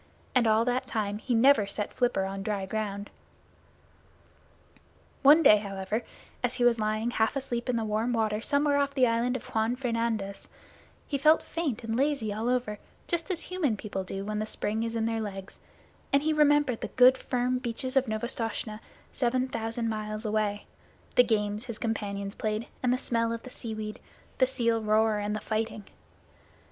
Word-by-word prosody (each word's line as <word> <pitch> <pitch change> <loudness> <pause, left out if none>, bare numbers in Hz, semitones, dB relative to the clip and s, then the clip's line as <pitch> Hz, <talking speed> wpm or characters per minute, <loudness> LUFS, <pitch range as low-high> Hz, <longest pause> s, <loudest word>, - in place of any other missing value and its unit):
And 245 -3 +4
all 220 +1 +4
that 250 +1 0
time 210 -3 -2
he 245 +2 -1
never 230 -3 +5
set 205 +1 -3
flipper 240 -6 +1
on 195 0 -4
dry 200 -1 -2
ground. 205 0 -4 2.1
One 295 +4 +7
day, 210 - +8
however, 200 +1 -3 0.4
as 250 0 0
he 250 - 0
was 240 -1 +4
lying 215 +2 0
half 220 +1 +1
asleep 250 -2 -3
in 250 - +1
the 225 -1 -1
warm 215 +3 0
water 220 -2 0
somewhere 285 +3 +2
off 280 0 0
the 260 -2 +5
Island 235 +2 +1
of 255 -1 -5
Juan 225 +1 0
Fernandez, 230 -5 -2 0.6
he 280 - -1
felt 310 +3 +5
faint 305 -9 -3
and 225 0 -2
lazy 270 -5 0
all 220 +3 -2
over, 245 -5 -1 0.3
just 345 +1 -1
as 350 -3 0
human 315 - -1
people 195 -2 -4
do 195 +1 -5
when 210 0 -2
the 215 - -2
spring 215 0 -2
is 230 0 -2
in 225 -1 0
their 225 0 -1
legs, 195 -2 -7 0.5
and 280 +1 +3
he 315 0 +2
remembered 290 -5 +3
the - - -2
good 255 +1 +6
firm 250 -1 -1
beaches 255 +2 -3
of 265 -1 +3
Novastoshnah 220 -1 -3 0.3
seven 255 0 +1
thousand 230 -1 -3
miles 215 0 -3
away, 210 -1 -1 0.5
the 245 - +7
games 210 0 0
his 235 -3 -5
companions 200 -3 -3
played, 215 +1 -2 0.2
the 250 0 +3
smell 230 -3 0
of 230 0 -4
the 255 - -10
seaweed, 215 -3 -5 0.4
the 260 - +5
seal 230 -3 +1
roar, 215 0 +2
and 205 +1 -2
the - - -2
fighting. 220 0 -3
230 Hz, 175 wpm, -28 LUFS, 215-255 Hz, 2.1 s, day